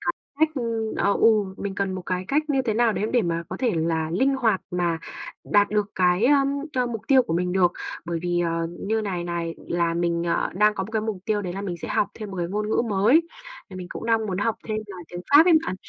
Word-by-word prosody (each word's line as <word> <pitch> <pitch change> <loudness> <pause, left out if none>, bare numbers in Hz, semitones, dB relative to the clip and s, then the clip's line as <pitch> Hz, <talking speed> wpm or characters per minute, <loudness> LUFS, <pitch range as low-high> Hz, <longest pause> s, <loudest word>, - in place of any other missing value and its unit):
cái - - -1 0.3
cách, 315 - +5
ưm 230 -4 -2
ờ, 200 - +2
ừ, 210 -4 +3
mình 200 -1 -4
cần 195 -1 -1
một 185 -1 -5
cái 185 0 -2
cách 300 +3 +2
như 270 -2 +2
thế 225 -4 -1
nào 230 -1 +3
đấy 210 - -1
để 245 -2 +3
mà 170 -2 -1
có - - -5
thể 245 -3 +1
là 160 0 0
linh 265 +10 +2
hoạt 225 -7 +1
mà 175 -2 0 0.5
đạt 205 0 +3
được 210 -1 0
cái, 180 +2 +3
ưm, 275 -1 +4 0.2
ơ, 250 -1 +1
mục 230 -3 -4
tiêu 265 -2 +6
của 165 - -4
mình 180 +1 0
được. 180 -2 +3 0.3
Bởi 170 -1 -2
vì, 175 0 0
ờ, 165 -1 0
như 220 +2 -1
này 185 -5 -3
này, 170 -1 -3
là 170 -1 0
mình, 170 0 0
ờ, 170 - 0
đang 210 +2 +4
có 190 - -2
một 215 - -10
cái 220 - 0
mục 220 -2 -2
tiêu 210 -2 0
đấy 180 - -4
là 195 - -5
mình 180 -4 -4
sẽ - - -7
học 200 - +1
thêm 215 -2 -7
một 190 - -7
cái 175 - -1
ngôn 210 +3 -2
ngữ 220 - +2
mới. 220 +12 +4 0.5
Thì 185 - -8
mình 180 -1 -6
cũng - - -6
đang 225 -1 +2
muốn 190 -1 -3
học 220 +2 0
thêm 215 - -1
nên 215 - -4
là 180 - -8
tiếng 175 0 -7
Pháp 295 +4 +8
ấy 345 - +6
bạn, - - -2
200 Hz, 270 wpm, -24 LUFS, 175-225 Hz, 0.5 s, Pháp